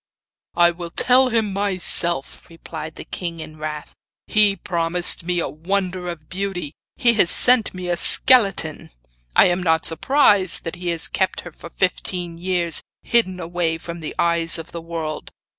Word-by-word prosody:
'I 175 0 +5
will 170 0 -8
tell 255 +8 +3
him 220 -4 0
myself,' 185 -6 -2
replied 160 -2 -8
the - - -8
king 170 -2 -5
in 155 -1 -9
wrath; 150 -1 -6 0.3
'he 210 -2 +3
promised 175 -1 -1
me 175 0 -1
a - - -1
wonder 180 +2 -3
of 155 -3 -8
beauty, 185 -5 -4 0.2
he 240 -3 +3
has 200 -6 +3
sent 245 +1 +3
me 180 -1 -6
a 175 - 0
skeleton! 195 - +3 0.5
I - - +7
am 175 +1 +1
not 160 -2 +2
surprised 200 - +4
that 165 0 -6
he 175 0 -6
has 170 -1 +1
kept - - -1
her - - -10
for - - -12
fifteen 170 - -2
years 175 -2 0 0.2
hidden 185 -6 +1
away 170 -1 -2
from 170 +1 -8
the 155 - -7
eyes 170 0 +2
of 165 0 -9
the 170 - -6
world. 165 -2 -5
175 Hz, 165 wpm, -21 LUFS, 165-190 Hz, 0.5 s, I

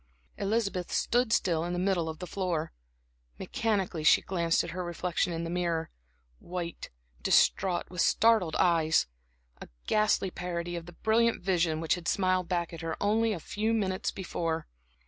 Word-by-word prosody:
Elizabeth 200 -3 -1
stood 245 -1 +1
still 165 -7 +2
in 175 +1 -3
the - - -2
middle 180 -3 0
of 160 - -6
the 180 - -6
floor. 180 - -2 0.6
Mechanically 195 - -1
she - - +6
glanced 170 -3 +1
at - - -6
her 180 +1 -4
reflection 175 +1 -1
in 165 0 -3
the 165 - -4
mirror; 170 -2 -1 0.5
white, 175 -1 -6 0.3
distraught, 180 -3 +3
with 180 -1 -1
startled 220 -8 +3
eyes 160 - +3 0.6
a - - -8 0.2
ghastly 210 -3 +2
parody 175 -1 -4
of 170 -1 -6
the 175 - -10
brilliant 225 +2 +1
vision 170 -4 +1
which 165 -1 +1
had 175 -2 -4
smiled 185 -2 +1
back 175 -2 -1
at 165 - -7
her 165 -1 -3
only 220 +2 +2
a 195 - -3
few 215 +7 -2
minutes 190 -3 -1
before. 165 -4 -3
180 Hz, 165 wpm, -29 LUFS, 170-195 Hz, 0.6 s, she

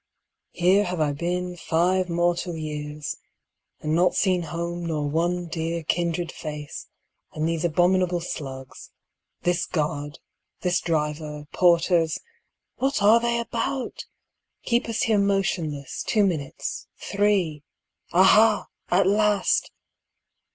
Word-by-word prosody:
Here 190 +4 +3
have 180 -2 -3
I 150 -2 +1
been 180 +4 -2
five 180 +2 +1
mor 175 +1 +2
tal 175 0 -4
years 150 -1 -5 0.6
and 155 0 -1
not 175 +2 +3
seen 185 -3 +2
home 170 +1 -4
nor 150 -3 -1
one 175 +4 0
dear 165 0 -3
kindred 170 +1 -1
face, 150 -2 -7 0.5
and 155 +1 -1
these 165 -1 -1
abominable 175 +1 +2
slugs, 135 -6 -7 0.5
this 175 0 +1
guard, 150 -2 -2 0.4
this 180 -1 +1
driver, 150 -2 -2
porters 170 -2 +3 0.3
— - - -58
what 270 -5 +1
are 220 +3 +7
they 235 0 0
about? 240 +2 -3 0.3
— - - -54
keep 235 0 +1
us 225 - 0
here 220 -2 +3
motionless, 185 -8 -1
two 210 -3 +2
minutes, 155 -7 -3
three. 195 -7 0 0.2
— - - -40
Aha! 210 +5 +5 0.2
at 185 +2 +4
last! 205 0 +2
175 Hz, 125 wpm, -25 LUFS, 155-190 Hz, 0.6 s, are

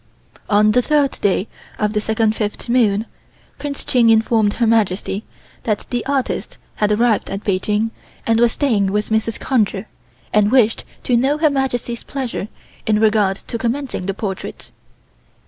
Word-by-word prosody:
On 210 0 +4
the 250 - +4
third 290 0 +2
day 200 +1 +1 0.3
of 210 0 0
the 210 - 0
second 220 0 +1
fifth 210 +1 -3
moon 225 -4 +2 0.5
Prince 280 -1 -5
Ching 240 -3 +4
informed 220 -1 +3
Her 235 - +1
Majesty 210 -2 +1 0.4
that 215 -3 -2
the 245 -2 -1
artist 275 -2 -2 0.2
had 210 0 +1
arrived 225 0 +2
at 195 +1 -4
Peking 210 +3 0 0.3
and 225 0 +2
was 235 -1 +4
staying 210 -9 +1
with 210 +1 -1
Mrs. 220 0 0
Conger 210 -5 0 0.5
and 210 0 +4
wished 235 -4 +3 0.2
to 245 - +2
know 270 +5 +2
Her 305 -1 +3
Majesty's 245 -3 -2
pleasure 255 -7 -4 0.4
in 215 -1 +3
regard 210 -3 +3
to 230 - -4
commencing 240 -4 -2
the 195 - -2
portrait. 195 -3 -6
225 Hz, 155 wpm, -19 LUFS, 210-245 Hz, 0.5 s, On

